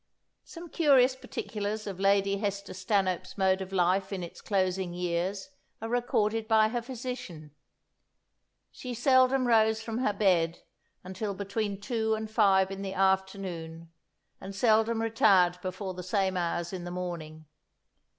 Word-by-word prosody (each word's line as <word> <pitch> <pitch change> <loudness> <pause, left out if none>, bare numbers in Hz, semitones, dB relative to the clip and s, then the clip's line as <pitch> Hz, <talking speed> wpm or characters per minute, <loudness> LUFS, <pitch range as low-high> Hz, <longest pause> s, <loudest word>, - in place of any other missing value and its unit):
Some 335 0 -11
curious 270 -6 +4
particulars 215 -4 -5
of 195 -2 -6
Lady 195 0 +2
Hester 200 -1 -3
Stanhope's 185 -1 -1
mode 190 -1 +2
of 190 0 -6
life 190 +1 +1
in 190 -2 -4
its 170 - -9
closing 185 -3 -1
years 180 +6 -2 0.3
are 225 - -5
recorded 225 -2 0
by 220 -1 +4
her 240 +1 -2
physician. 240 - -7 1.2
She 250 -2 -7
seldom 260 +1 +4
rose 220 -1 +3
from 225 0 -4
her 255 -5 +1
bed 180 -5 +1 0.4
until 190 +2 -4
between 200 0 -3
two 220 +1 -1
and 220 0 -6
five 195 -3 +3
in 195 0 -6
the 195 -1 -5
afternoon, 190 -4 -1 0.5
and 195 +1 -8
seldom 225 +1 +2
retired 190 -6 +3
before 185 +1 -5
the 180 - -7
same 190 +1 0
hours 175 0 -2
in 180 -2 -5
the 175 - -6
morning. 170 -3 -6
195 Hz, 140 wpm, -29 LUFS, 185-220 Hz, 1.2 s, curious